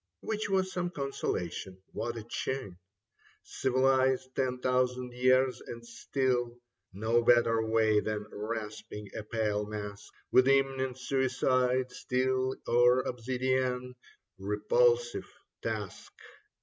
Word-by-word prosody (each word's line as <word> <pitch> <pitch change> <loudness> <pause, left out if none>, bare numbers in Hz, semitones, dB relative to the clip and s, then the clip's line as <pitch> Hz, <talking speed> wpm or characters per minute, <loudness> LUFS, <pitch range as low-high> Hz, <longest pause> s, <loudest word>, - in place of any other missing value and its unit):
Which 215 -1 -2
was 190 -1 +1
some 175 -1 -1
consolation. 95 - -3
What 120 0 -3
a 110 - -6
chin! 120 -4 -4 0.6
Civilized 130 0 +1
ten 130 -1 0
thousand 125 0 0
years, 130 +1 +3
and 115 0 -8
still 120 0 -1 0.3
No 110 +5 +1
better 115 -1 +4
way 110 -1 +3
than 105 -1 -3
rasping 105 -1 -6
a - - -3
pale 105 -1 -1
mask 105 -1 -7 0.2
With 130 +1 +6
imminent 135 -2 +2
suicide, 130 -1 +1
steel 130 +1 0
or 125 +1 +5
obsidian: 125 +1 -1 0.5
Repulsive 485 0 +1 0.3
task - - -5
125 Hz, 105 wpm, -30 LUFS, 115-130 Hz, 0.6 s, With